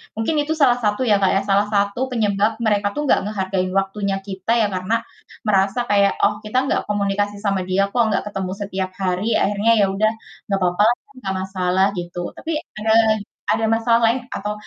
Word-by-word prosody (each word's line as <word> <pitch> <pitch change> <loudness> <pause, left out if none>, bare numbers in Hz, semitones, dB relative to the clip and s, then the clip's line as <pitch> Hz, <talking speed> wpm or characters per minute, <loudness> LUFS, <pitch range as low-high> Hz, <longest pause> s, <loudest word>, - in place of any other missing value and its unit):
mungkin 225 +8 -1
itu 310 +2 -1
salah 245 -3 +5
satu 210 +3 0
ya 205 - +6
Kak, 190 - +3
ya, 195 - +2
salah 200 +1 +3
satu 200 +2 +1
penyebab 210 -2 +1
mereka 210 -2 +1
tuh 295 - -3
nggak - - +5
ngehargain 190 -3 -2
waktunya 195 0 -2
kita 190 +3 -4
ya 210 - +3
karena 185 +5 0 0.5
merasa 195 +2 +2
kayak, 200 -1 +4
"Oh, 210 0 +2
kita 215 +4 -2
nggak - - +1
komunikasi 205 0 0
sama 195 -2 0
dia 195 +2 +2
kok, 240 +4 +1
nggak - - 0
ketemu 190 -2 -4
setiap 190 -2 -3
hari. 185 +1 -1 0.2
Akhirnya 205 +3 +2
ya 200 - +5
udah 215 +3 +1 0.3
nggak 195 -3 -1
apa-apa 180 +2 +1
lah 240 - +2
kan 280 - -24
nggak 190 0 -2
masalah," 190 0 +1
gitu. 175 0 -5
Tapi, 330 - -5 0.3
ada 220 +1 0 0.6
ada 225 - 0
masalah 230 +1 +3
lain 235 +3 +1
atau 210 +1 -3
200 Hz, 190 wpm, -21 LUFS, 195-215 Hz, 0.6 s, ya